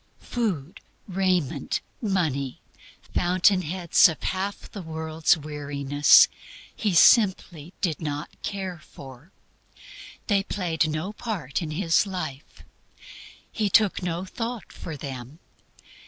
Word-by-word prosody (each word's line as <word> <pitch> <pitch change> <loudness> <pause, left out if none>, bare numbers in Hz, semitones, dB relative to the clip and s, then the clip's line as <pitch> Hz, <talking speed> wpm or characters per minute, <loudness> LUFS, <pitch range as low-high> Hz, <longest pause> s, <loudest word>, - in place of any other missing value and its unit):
Food, 185 - -3 0.3
raiment, 185 -6 0 0.2
money 155 - -1 0.5
fountain 185 +2 +3
heads 175 +1 +4
of 160 - -7
half 195 +2 -3
the 200 - -7
world's 160 0 0
weariness 145 -1 +4 0.5
He 205 -5 -1
simply 185 - +4
did 170 -4 -1
not 150 0 -5
care 190 -3 -4
for; 135 +2 -13 0.9
they 200 -3 +2
played 170 -6 -1
no 155 +7 -3
part 190 - -4
in 160 - -4
His 165 +4 +2
life; 155 -7 -6 0.9
He 215 -2 -1
"took 205 0 +3
no 175 0 -3
thought" 230 +3 -6
for 160 -3 -7
them. 130 0 -8
170 Hz, 110 wpm, -25 LUFS, 150-195 Hz, 0.9 s, heads